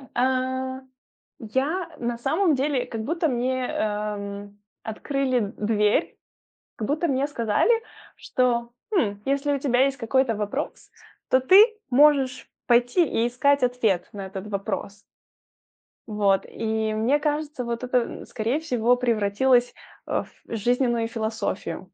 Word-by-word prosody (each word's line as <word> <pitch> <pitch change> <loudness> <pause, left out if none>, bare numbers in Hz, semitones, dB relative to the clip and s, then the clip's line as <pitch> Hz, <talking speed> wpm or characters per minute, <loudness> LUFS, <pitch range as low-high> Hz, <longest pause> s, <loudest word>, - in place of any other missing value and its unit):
А, 260 +1 0 0.6
я 290 - -2
на 235 -1 -3
самом 315 +6 +2
деле, 265 -2 0
как 225 -3 -5
будто 330 +5 0
мне, 255 0 -1
эм, 205 -1 -4 0.2
открыли 250 -1 -1
дверь, 210 +5 +1 0.6
как 215 - -3
будто 310 +3 0
мне 270 +1 +1
сказали, 235 - +1 0.4
что: 240 -2 0 0.2
хм, 205 - +1
если 280 +1 0
у 280 - 0
тебя 260 -1 +2
есть 275 0 0
какой-то 250 0 +1
вопрос, 210 +8 -4 0.4
то 260 - +4
ты 380 +11 +8 0.3
можешь 270 -1 +4 0.2
пойти 245 +8 +4
и 230 -2 0
искать 280 +3 +2
ответ 230 -8 +1
на 195 -2 -6
этот 190 +1 -7
вопрос. 200 0 -4 1.1
Вот 200 -2 +2
и 220 -1 -2
мне 240 +7 +2
кажется, 295 -3 -2
вот 235 +1 -3
это, 250 0 +2
н 235 - -5
скорее 235 +6 -1
всего, 245 -6 +1
превратилось, 240 +1 +2 0.4
э, - - -4 0.3
в 230 - -4
жизненную 240 +1 +1
философию. 220 -4 -4
245 Hz, 130 wpm, -24 LUFS, 220-270 Hz, 1.1 s, ты